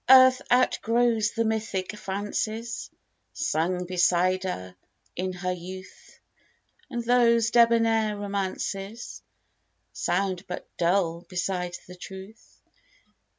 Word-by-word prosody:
ARTH 260 -1 +8
outgrows 235 -3 +3
the 230 0 0
mythic 220 -3 -2
fancies 215 +3 -3 0.4
Sung 180 - 0
beside 185 +1 +2
her 90 - -5 0.4
in 185 +1 -2
her 180 0 -3
youth; 185 +1 -9 0.7
And 240 -1 -3
those 235 -2 +4
debonair 230 -2 +4
romances 200 +2 -4 0.7
Sound 185 -1 -1
but 180 - -6
dull 170 -1 +1
beside 180 -1 -2
the 180 - -10
truth. 190 +4 -11
195 Hz, 95 wpm, -26 LUFS, 180-230 Hz, 0.7 s, ARTH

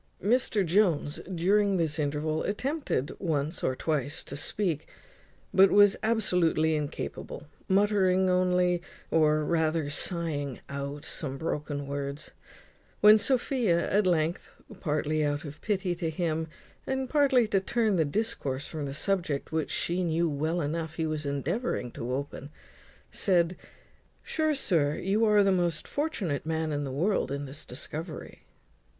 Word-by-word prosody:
Mr 215 -2 +2
Jones 170 -5 +2
during 195 +3 +2
this 160 -3 -1
interval 150 +2 -1
attempted 260 - -2
once 155 -2 -2
or 130 - +1
twice 145 -1 -2
to 140 - -7
speak, 160 +1 -1 0.7
but 195 0 +7
was 205 -1 +6
absolutely 180 -8 +2
incapable, 150 +1 -5 0.2
muttering 190 -2 +3
only, 180 -1 +2 0.3
or 155 -1 +3
rather 160 -2 +1
sighing 150 -4 -2
out, 140 +2 -5
some 135 -5 -4
broken 145 -2 -3
words; 140 +1 -5 0.7
when 210 +1 +8
Sophia 240 -7 +1
at 200 -1 +3
length, 165 0 0 0.3
partly 155 -1 0
out 145 +1 -1
of 145 +1 -9
pity 190 -4 0
to 170 -1 -2
him, 160 -1 -1 0.4
and 265 0 -1
partly 270 -5 +3
to 200 -2 +2
turn 215 +1 +1
the 165 - +3
discourse 145 -6 -2
from 155 -2 -5
the 135 0 -5
subject 170 -6 -1
which 160 -1 -1
she 180 +2 -1
knew 170 0 +1
well 160 +3 -1
enough 160 +1 -3
he 160 - -1
was 155 -2 -3
endeavouring 140 - -2
to 120 +2 -5
open, 140 +1 -4 0.6
said 180 -2 +2 0.7
"Sure, 310 -1 0
sir, 155 - +1
you 205 +4 0
are 210 -1 +5
the 195 - +3
most 175 -4 0
fortunate 210 - -2
man 160 0 -1
in 145 -1 -1
the 135 - -4
world 175 +8 0
in 140 +1 -3
this 140 +2 -7
discovery." 155 +6 -7
165 Hz, 140 wpm, -28 LUFS, 150-195 Hz, 0.7 s, when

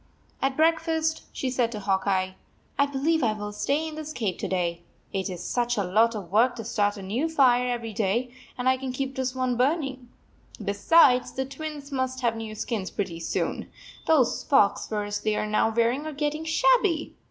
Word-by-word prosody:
At 270 0 0
breakfast, 320 0 +1
she 260 - -3
said 245 -2 +1
to 210 - -4
Hawk 195 -1 0
Eye, 185 -1 +1 0.4
"I 280 - +3
believe 295 +4 +1
I 225 -4 +2
will 210 -1 -5
stay 285 +9 -1
in 315 - -6
the 310 0 -6
cave 205 -7 -2
to - - -2
day, 175 -2 -1 0.3
it 195 0 -1
is 180 -1 -6
such 240 +3 0
a 200 - +1
lot 220 +5 +3
of 190 -5 -7
work 235 +5 +4
to 230 - -6
start 205 -3 0
a 195 - -8
new 240 +12 -1
fire 250 -5 +4
every 235 -2 -3
day, 225 +5 0 0.3
and 250 0 -2
I 260 0 +4
can 260 0 -4
keep 265 +1 -3
this 260 -1 -2
one 255 -2 0
burning. 265 -2 0 0.5
Be 200 -2 -2
sides, 250 +3 +5
the 265 - -2
Twins 290 +1 -7
must 260 -1 -2
have 235 -2 +1
new 220 -1 -6
skins 215 -3 -3
pretty 180 -5 -4
soon. - - -2 0.4
Those 280 -7 +3
fox 240 -8 +3
furs 205 -1 -2
they 215 -1 0
are - - -1
now 215 +1 +2
wearing 235 +6 +1
are 310 - -5
getting 300 +2 -2
shabby. 395 -1 +2
245 Hz, 200 wpm, -26 LUFS, 210-280 Hz, 0.5 s, sides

